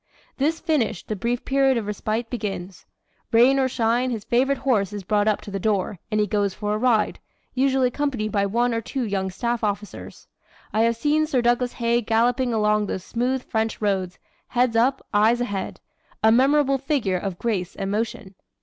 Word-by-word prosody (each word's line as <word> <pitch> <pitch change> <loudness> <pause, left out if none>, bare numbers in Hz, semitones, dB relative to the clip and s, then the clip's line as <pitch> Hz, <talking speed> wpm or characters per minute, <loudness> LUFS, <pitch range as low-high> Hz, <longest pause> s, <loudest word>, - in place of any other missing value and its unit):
"This 310 +4 0
finished, 270 - -1
the 215 - -1
brief 235 +5 -2
period 270 -1 +3
of 225 - -2
respite 215 +3 -2
begins. 195 -5 -5 0.4
Rain 250 +4 +5
or 265 - +3
shine, 240 +2 +1
his 225 -4 -4
favorite 265 +5 +1
horse 215 -8 +1
is 205 -1 -5
brought 205 +2 +1
up 215 - +1
to 205 - -9
the 195 - -3
door, 200 -2 -1
and 215 -1 0
he 210 - +3
goes 205 -1 -1
for 210 0 -2
a - - 0
ride, 230 -3 +2 0.3
usually 265 -1 +2
accompanied 250 -6 -2
by 200 -2 +1
one 240 +4 +1
or 230 - -1
two 250 +2 -3
young 195 -2 -1
staff 235 +5 -2
officers. 210 0 -4 0.5
I 220 - +2
have 230 +1 +3
seen 300 +5 +1
Sir 260 -6 +1
Douglas 240 +1 +1
Haig 235 -1 0
galloping 240 +2 +2
along 210 -1 +1
those 185 - -4
smooth 250 +4 -1
French 220 -1 -2
roads, 190 -4 -1 0.3
head 245 -1 +1
up, 255 +4 +2
eyes 220 +3 +4
ahead 205 -6 -3 0.4
a 220 - +6
memorable 275 +3 +3
figure 250 -10 0
of 195 -2 -4
grace 195 -5 -2
and 195 0 -3
motion. 220 -1 -3
230 Hz, 185 wpm, -23 LUFS, 205-255 Hz, 0.5 s, a